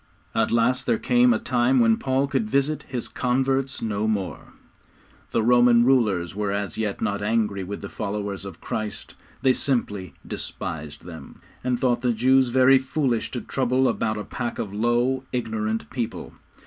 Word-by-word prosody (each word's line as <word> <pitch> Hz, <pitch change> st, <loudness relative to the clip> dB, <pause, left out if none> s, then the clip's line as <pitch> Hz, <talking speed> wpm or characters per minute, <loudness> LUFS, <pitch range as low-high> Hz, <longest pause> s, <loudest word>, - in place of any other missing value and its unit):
At 110 Hz, -, +1 dB
last 125 Hz, +2 st, +1 dB
there 115 Hz, -, +3 dB
came 125 Hz, +1 st, +4 dB
a 115 Hz, -, +3 dB
time 125 Hz, +2 st, +2 dB
when 115 Hz, -1 st, +5 dB
Paul 135 Hz, +1 st, +1 dB
could 130 Hz, -6 st, -1 dB
visit 140 Hz, +5 st, 0 dB
his 125 Hz, -3 st, -4 dB
converts 135 Hz, +1 st, 0 dB
no 110 Hz, -1 st, -1 dB
more. 100 Hz, -4 st, -3 dB, 0.8 s
The 115 Hz, -, 0 dB
Roman 120 Hz, 0 st, +5 dB
rulers 105 Hz, -10 st, +2 dB
were 105 Hz, 0 st, -2 dB
as 100 Hz, -1 st, -3 dB
yet 105 Hz, -3 st, -2 dB
not 100 Hz, 0 st, -1 dB
angry 105 Hz, -2 st, 0 dB
with 100 Hz, +2 st, -6 dB
the 100 Hz, -, -5 dB
followers 100 Hz, -2 st, -4 dB
of 95 Hz, -4 st, -9 dB
Christ. 110 Hz, -1 st, -5 dB, 0.3 s
They 130 Hz, -1 st, +5 dB
simply 105 Hz, -, -2 dB
despised 75 Hz, -1 st, -6 dB
them, 85 Hz, -2 st, -10 dB, 0.2 s
and 125 Hz, -1 st, 0 dB
thought 125 Hz, -2 st, +1 dB
the 125 Hz, -2 st, +1 dB
Jews 130 Hz, +3 st, +4 dB
very 130 Hz, +2 st, +5 dB
foolish 130 Hz, -3 st, -1 dB
to 120 Hz, -, -4 dB
trouble 130 Hz, 0 st, +1 dB
about 110 Hz, -2 st, 0 dB
a 105 Hz, -, -4 dB
pack 120 Hz, +1 st, -4 dB
of 100 Hz, -3 st, -4 dB
low, 120 Hz, +4 st, +1 dB
ignorant 110 Hz, -2 st, -2 dB
people. 120 Hz, -3 st, -4 dB
120 Hz, 165 wpm, -24 LUFS, 105-130 Hz, 0.8 s, when